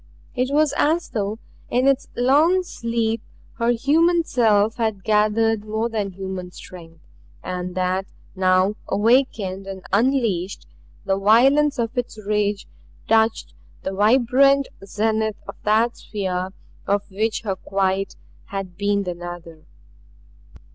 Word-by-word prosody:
It 255 +1 -1
was 295 0 +3
as 325 +3 +1
though 210 -1 -2 0.3
in 250 +2 +2
its 275 -1 +2
long 300 +9 +3
sleep 230 -7 -2 0.4
her 230 0 +1
human 325 +8 +3
self 220 -6 +2
had 220 -5 -1
gathered 215 0 +2
more 220 +2 -2
than 205 -4 -3
human 190 -1 -6
strength, 165 -3 -13 0.4
and 180 0 -4
that 185 +1 -1 0.3
now, 185 +1 +3
awakened 205 -4 +1
and 190 -1 -7
unleashed, 215 -5 +1 0.4
the 195 0 0
violence 270 +8 +4
of 235 +1 -2
its 245 -3 -3
rage 210 -1 -1 0.4
touched 225 0 +2 0.3
the 190 - -3
vibrant 260 +6 +4
zenith 220 +1 -1
of - - -6
that 220 +3 +2
sphere 185 -3 -3 0.4
of 200 0 +1
which 215 +3 -1
her 195 -3 -2
quiet 195 0 -1 0.3
had 195 -3 -6
been 200 0 +1
the 180 -2 -3
nadir. 175 -2 -9
215 Hz, 125 wpm, -22 LUFS, 195-240 Hz, 0.4 s, violence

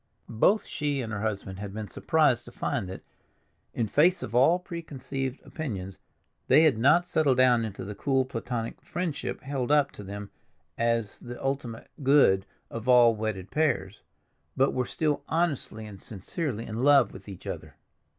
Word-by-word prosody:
Both 190 - +2
she 145 -2 -2
and 115 -2 -5
her 105 - -3
husband 100 -3 -3
had 100 -1 -6
been 110 -1 -4
surprised - - +2
to - - -11
find 95 - -2
that, 95 - -8 0.7
in 115 - 0
face 175 - +3
of - - -6
all 135 +8 +5
preconceived 140 -7 -5
opinions, 95 - -5 0.5
they 155 - +6
had 145 -9 +4
not 150 +8 +4
settled 150 -7 +2
down 125 -2 +5
into 105 -4 -5
the 105 - -5
cool, 135 +5 +1
platonic 115 -2 -4
friendship 175 -5 -4
held 135 -1 -2
up 145 -2 +4
to 105 - -10
them 100 +1 -7 0.4
as 115 -3 0
the 120 0 -8
ultimate 135 -4 -4
good 135 -9 +4 0.2
of 115 +2 -5
all 120 -2 +7
wedded 105 -4 -4
pairs, 125 -10 0 0.6
but 135 +1 +3
were 125 -1 -1
still 150 -2 0
honestly 150 -9 -1
and 100 -3 -10
sincerely 115 - -4
in 110 +2 -4
love 140 -5 +5
with - - -11
each 95 - -10
other. - - -6
125 Hz, 165 wpm, -28 LUFS, 110-145 Hz, 0.7 s, all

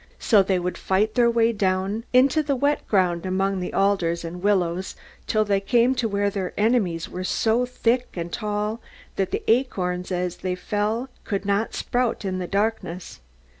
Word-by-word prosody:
So 215 -4 +4
they 190 -1 +1
would 180 0 -3
fight 205 +3 +1
their 240 -1 +4
way 230 0 +3
down 195 +2 -1
into 265 +5 +4
the 285 -2 0
wet 285 +3 0
ground 180 -4 +1
among 190 +1 0
the 180 - -4
alders 180 -4 +1
and 175 +2 -6
willows, 185 -2 0 0.3
till 215 0 +2
they 200 -1 +2
came 240 +5 +3
to 245 -3 -1
where 200 0 0
their 190 -2 -3
enemies 205 -7 +1
were 185 - -6
so 225 +6 +1
thick 250 0 0
and 170 -1 -5
tall, 210 +1 -2 0.3
that 195 -1 0
the - - -3
acorns 185 -7 0
as 180 -1 -2
they 185 -1 -2
fell 210 +7 -2
could 200 -1 -3
not 200 +2 0
sprout 245 -4 -1
in 185 -1 -2
the 180 - -3
darkness. 200 - -2
200 Hz, 175 wpm, -24 LUFS, 185-230 Hz, 0.3 s, So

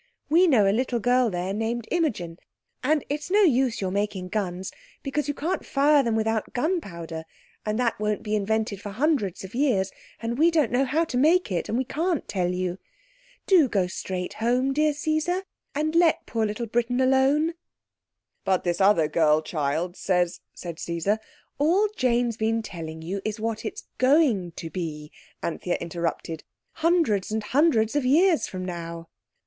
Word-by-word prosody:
We 345 +5 +5
know 225 - +4
a 195 - +3
little 245 +1 0
girl 245 +1 +3
there 180 0 -2
named 225 +2 -2
Imogen. 205 - -1 0.4
And 295 +2 +1
it's 295 +3 -4
no 410 +3 +4
use 260 - +2
your 190 -1 -1
making 200 -2 -2
guns 190 -2 -3 0.3
because 295 +1 -2
you 290 - -2
can't 335 +6 -2
fire 290 +1 +4
them 230 -4 0
without 220 0 -1
gunpowder, 175 - -3 0.4
and 215 0 0
that 235 -3 0
won't 210 0 -1
be 215 0 -1
invented 215 -1 -1
for 205 - -6
hundreds 215 - 0
of 190 - -9
years, 235 -8 +1 0.3
and 230 +3 -3
we 330 +2 +6
don't 310 -8 +2
know 255 +3 +2
how 310 +5 +1
to 250 -5 -2
make 325 - +3
it, 175 - -2
and 225 - 0
we 260 - +1
can't 325 +5 -1
tell 180 -3 0
you. 180 0 -2 0.7
Do 350 -8 +5
go 195 -4 +1
straight 180 0 -4
home, 250 +4 +1
dear 305 +1 +2
Caesar, 315 +5 0 0.3
and 310 +2 0
let 335 -1 +3
poor 225 -2 0
little 210 +3 -3
Britain 240 +2 0
alone." 270 +5 +3 0.9
"But 190 -2 +1
this 175 +1 -1
other 190 -5 +5
girl 155 -1 +3
child 155 +3 -2
says—" 180 -2 0
said 170 -2 -7
Caesar. 170 +6 -1 0.4
"All 355 +9 +3
Jane's 240 -2 +1
been 225 +1 0
telling 160 -5 -7
you 190 +4 -3
is 215 0 -3
what 220 0 -3
it's 440 - -5 0.2
going 255 - +3
to 165 -1 -7
be," 155 -4 -5 0.3
Anthea 175 +1 -2
interrupted, 165 -1 -4 0.3
"hundreds 320 - +1
and 220 0 -2
hundreds 250 -2 +2
of 290 - +2
years 325 +6 +4
from 185 -1 -5
now." 170 -2 -6
225 Hz, 170 wpm, -25 LUFS, 185-290 Hz, 0.9 s, we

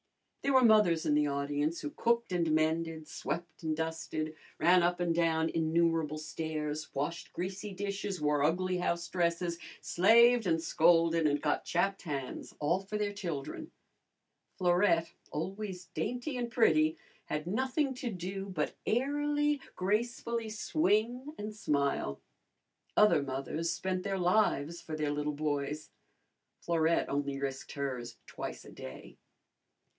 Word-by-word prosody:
There 275 - +1
were 260 - +7
mothers 210 -8 +5
in 150 - +3
the 150 0 +3
audience 145 +3 -1
who 145 - -4
cooked 235 -2 +1
and 170 -3 +1
mended, 160 0 0
swept 170 +1 -5
and 155 -2 -1
dusted, 160 -1 -3 0.2
ran 175 +3 +5
up 175 +1 +1
and 175 -1 +1
down 165 -1 +2
innumerable 165 -1 +1
stairs, 155 -1 -4
washed 165 +5 -3
greasy 190 +3 -4
dishes, 200 0 -3
wore 150 -1 +2
ugly 180 +4 +1
house 170 -1 -1
dresses, 170 0 0 0.2
slaved 230 +4 +5
and 165 -1 +2
scolded 165 0 +4
and 145 0 +1
got 150 - +1
chapped 195 +1 0
hands, 140 -6 -5
all 165 +5 +2
for 195 +2 -4
their 205 -1 -1
children. 175 - -5 0.9
Florette, 175 -2 +3 0.2
always 190 +3 -4
dainty 250 +3 -2
and 240 -1 -2
pretty, 155 -10 +3 0.3
had 150 0 -3
nothing 265 - 0
to 250 -1 -4
do 190 0 -5
but 165 -6 -2
airily, 290 +3 +1
gracefully 230 +3 -1
swing, 245 +4 0
and 210 +1 -5
smile. 140 - 0 0.8
Other 190 -8 +6
mothers 140 +5 -2
spent 185 +2 -2
their 195 0 -2
lives 175 -4 +2
for 155 - -5
their 150 -1 -1
little 150 0 -1
boys. 145 0 -2 0.7
Florette 165 -1 +2
only 140 -1 -1
risked 135 -1 -4
hers 130 -4 -4
twice - - -6
a - - -11
day. - - -10
170 Hz, 135 wpm, -32 LUFS, 155-205 Hz, 0.9 s, were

